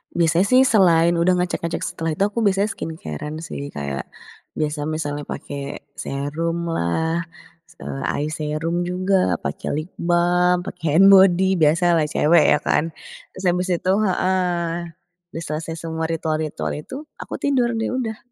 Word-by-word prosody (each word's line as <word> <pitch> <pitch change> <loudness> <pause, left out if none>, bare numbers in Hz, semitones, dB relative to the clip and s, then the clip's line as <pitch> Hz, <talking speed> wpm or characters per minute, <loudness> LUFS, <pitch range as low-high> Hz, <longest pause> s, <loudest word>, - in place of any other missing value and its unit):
Biasanya 170 +2 +3
sih 255 +3 +6
selain 175 -8 +4
udah 180 +2 +3
ngecek-ngecek, 180 -2 -2
setelah 165 0 -3
itu 195 - +1
aku 205 +3 -1
biasanya 200 +1 +2
skincare-an 155 - -6
sih, 140 -2 -6
kayak 70 -1 -4 0.5
biasa 150 -1 -2
misalnya 145 -2 -3
pakai 140 0 -6 0.2
serum 150 +5 -2
lah, 160 - -1 0.4
se - - -15
eye 145 +2 -3
serum 160 +3 -2
juga, 185 - +1
pakai 70 +1 -4
lip 155 +3 -4
balm, 175 +1 +2
pakai 160 -4 -3
hand 195 +3 +7
body, 190 -1 +5
biasalah 165 +1 +3
cewek 165 +2 +4
ya - - +1
kan. 150 - +2 0.5
Terus 190 - -8
habis 180 +1 -1
itu 185 +2 0 0.2
heeh. 175 -3 -1 0.4
Udah 165 - -4
selesai 160 +1 -4
semua 160 0 -4
ritual-ritual 155 -1 -2
itu, 255 - -9 0.2
aku - - -6
tidur 250 -4 +1
deh, 225 0 -1
udah. 235 -4 -2
170 Hz, 145 wpm, -21 LUFS, 155-185 Hz, 0.5 s, hand